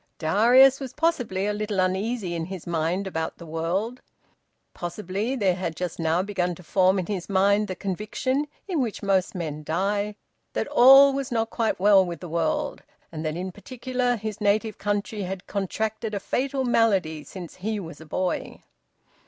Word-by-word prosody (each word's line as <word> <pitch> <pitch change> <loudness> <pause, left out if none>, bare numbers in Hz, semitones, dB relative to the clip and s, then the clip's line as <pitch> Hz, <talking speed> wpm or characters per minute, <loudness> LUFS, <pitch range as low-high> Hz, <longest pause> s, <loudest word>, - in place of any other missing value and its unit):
Darius 245 +11 +5
was 265 -2 -6
possibly 250 - 0
a 210 - 0
little 210 -1 -2
uneasy 190 +1 0
in 165 -1 -2
his 185 -1 -7
mind 170 +3 -1
about 160 -4 -3
the 170 - -10
world. 175 +10 -2 0.7
Possibly 200 +7 -3
there 200 -7 +2
had 175 -3 -3
just 180 -1 -4
now 165 +2 +1
begun 180 -3 -1
to 180 - -14
form 185 +3 +3
in 185 - -1
his 190 -2 -4
mind 200 +2 +3
the 185 - -4
conviction, 215 - -2 0.2
in 345 -7 0
which 230 -5 -3
most 195 -2 +1
men 155 -4 -4
die, 200 +6 -1 0.4
that - - -1
all 270 +2 +8
was 275 -1 -3
not 225 -1 0
quite 225 -5 0
well 195 0 +6
with 170 -3 -5
the 180 - -8
world, 165 -1 -1 0.3
and 160 -1 -5
that 155 +1 -2
in 185 +1 -4
particular 245 +5 -2
his 215 -1 -5
native 210 +1 +1
country 205 +1 -2
had 190 0 -5
contracted 215 +2 -3
a - - -1
fatal 265 +5 -1
malady 195 -10 +2
since 180 0 -9
he 210 +3 -2
was 165 -3 -9
a - - -10
boy. 185 +4 -2
200 Hz, 175 wpm, -25 LUFS, 180-225 Hz, 0.7 s, all